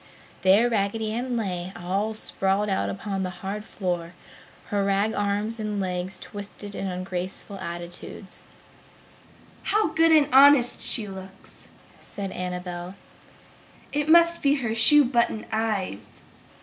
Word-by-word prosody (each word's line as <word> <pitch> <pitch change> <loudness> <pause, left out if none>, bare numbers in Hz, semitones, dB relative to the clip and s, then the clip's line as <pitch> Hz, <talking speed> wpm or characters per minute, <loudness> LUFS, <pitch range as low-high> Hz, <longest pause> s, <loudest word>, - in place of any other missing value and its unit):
There 200 +5 +5
Raggedy 215 0 -1
Ann 245 +1 -2
lay; 185 -4 -3
all 195 +5 -2
sprawled 200 0 0
out 190 - 0
upon 195 -1 -4
the 185 - -2 0.2
hard 205 +2 -3
floor, 175 -5 -4 0.5
her 200 -1 0
rag 200 +2 +1
arms 205 +3 -1
and 210 -1 -3
legs 185 0 -3
twisted 205 0 -8
in 195 - -4
ungraceful 185 +2 -5
attitudes. 175 -1 -7 1.2
"How 425 -4 +1
good 325 +1 +3
and 305 -3 +5
honest 270 -2 +6
she 220 -4 +1
looks!" 190 0 -12 0.3
said 195 -2 -6
Annabel. 180 0 -5 1.0
"It 295 +1 -1
must 340 +1 +5
be 285 0 +3
her 240 -6 -2
shoe 270 +6 +7
button 235 -3 0
eyes!" 215 - -2
205 Hz, 125 wpm, -25 LUFS, 190-230 Hz, 1.2 s, shoe